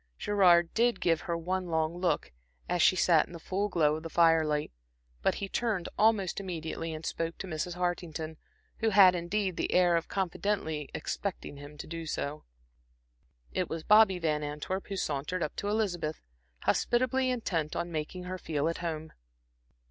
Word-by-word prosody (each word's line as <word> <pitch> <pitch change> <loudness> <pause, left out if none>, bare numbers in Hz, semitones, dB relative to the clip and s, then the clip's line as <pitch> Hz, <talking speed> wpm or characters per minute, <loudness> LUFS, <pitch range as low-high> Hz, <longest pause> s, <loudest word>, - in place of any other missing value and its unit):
Gerard 175 - +4
did 240 +1 +2
give 165 -3 +2
her 170 -1 -2
one 185 +2 -2
long 160 0 0
look, 175 - 0 0.4
as 175 -1 0
she 185 - +6
sat 170 -3 +4
in - - -13
the 170 - -7
full 195 +5 -2
glow 155 -5 +2
of - - -8
the 165 - -6
firelight; 160 -3 +3 0.5
but - - +2
he 200 - -4
turned 210 -4 -1
almost 210 -4 +2
immediately 165 -3 -4
and 155 0 -6
spoke 165 0 -3
to - - -5
Mrs. 175 0 -3
Hartington, 170 -3 -3 0.4
who 225 - +2
had, 195 -3 +7
indeed, 185 +1 -1
the - - -1
air 180 -1 +4
of 165 - 0
confidently 180 -5 -2
expecting 180 -2 -4
him 145 +1 -11
to - - -7
do 165 0 -6
so. 150 0 -4 1.1
It - - -1
was 165 -1 -4
Bobby 210 -2 +6
Van 155 -3 0
Antwerp 150 +6 -4
who 195 - -4
sauntered 155 +3 -2
up 150 - -4
to 200 - -3
Elizabeth, 180 -8 -1 0.4
hospitably 255 +2 +2
intent 175 -11 -1
on 175 - -2
making 160 +3 -4
her 185 +1 -5
feel 155 -3 -1
at 165 - -3
home. 160 -2 -4
170 Hz, 170 wpm, -30 LUFS, 160-190 Hz, 1.1 s, had